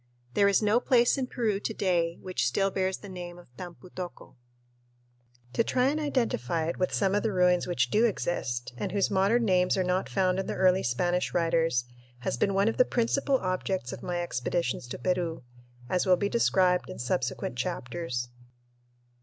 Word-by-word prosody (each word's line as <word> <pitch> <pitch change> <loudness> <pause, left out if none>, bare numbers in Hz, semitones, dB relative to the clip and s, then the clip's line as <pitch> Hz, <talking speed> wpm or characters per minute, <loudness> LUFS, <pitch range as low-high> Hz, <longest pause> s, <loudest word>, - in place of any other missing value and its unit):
There 200 - +4
is 200 +2 +3
no 210 +3 +4
place 245 -1 +3
in 265 -2 -2
Peru 220 -6 -1
to 220 - -3
day 170 -3 0
which 185 -9 -1
still 195 +10 +1
bears 190 0 -1
the 205 - -11
name 175 -2 -7
of 175 -9 -17
Tampu 180 +2 -10
tocco. 180 -6 -8 1.2
To 230 - +2
try 255 +3 +2
and 300 +2 -1
identify 230 - 0
it 170 - -4
with 185 - +1
some 195 -1 +1
of 205 - +2
the 220 - 0
ruins 180 -2 +3
which 125 -8 0
do 220 +3 +4
exist, 125 - -2
and 185 - -3
whose 200 0 +1
modern 200 +5 +3
names 180 -1 +3
are 190 - +2
not 180 +1 0
found 185 -1 +1
in 195 - -3
the - - -3
early 185 0 +4
Spanish 175 +9 0
writers, 165 -7 +2 0.4
has - - -1
been 195 +11 0
one 200 +2 +3
of 225 - 0
the - - +7
principal 265 +3 +1
objects 185 - -2
of - - -8
my 175 -1 -2
expeditions 130 -3 -2
to - - -6
Peru, 175 -4 -1 0.4
as 180 +7 0
will 180 -1 +5
be 200 +1 -1
described 185 -6 +2
in 185 - -7
subsequent 125 0 -2
chapters. 125 0 -3
185 Hz, 185 wpm, -28 LUFS, 170-200 Hz, 1.2 s, the